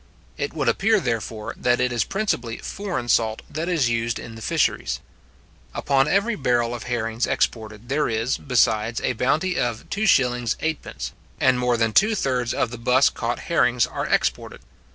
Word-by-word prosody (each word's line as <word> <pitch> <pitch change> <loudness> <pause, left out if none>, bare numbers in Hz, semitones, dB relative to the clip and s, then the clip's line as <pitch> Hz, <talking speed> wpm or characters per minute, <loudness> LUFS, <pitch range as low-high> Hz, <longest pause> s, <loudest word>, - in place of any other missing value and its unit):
It - - -4
would - - -1
appear, 215 +2 +3
therefore, 115 - -3
that 120 0 +2
it 125 -1 +1
is 120 -3 +1
principally 130 - -2
foreign 180 -12 -4
salt 110 -2 +1
that 160 +4 -4
is 160 -8 +2
used 115 0 -1
in 115 - -8
the 115 - -10
fisheries. - - 0 0.8
Upon 135 0 +2
every 200 +7 +2
barrel 120 - +1
of 120 - -6
herrings 115 -1 -1
exported, 110 0 -2
there 145 +3 0
is, 115 +3 -1
besides, 115 -3 +1
a 130 - 0
bounty 155 +9 0
of 120 -3 -2
2s:8d. 135 - 0 0.3
and 130 -1 +3
more 125 -1 +1
than 115 -1 +1
two 215 - +4
thirds 125 - 0
of 120 - -1
the 120 - -7
buss 125 +3 +4
caught 120 +1 -3
herrings 125 -7 +2
are - - -4
exported. - - -1
125 Hz, 165 wpm, -23 LUFS, 115-145 Hz, 0.8 s, two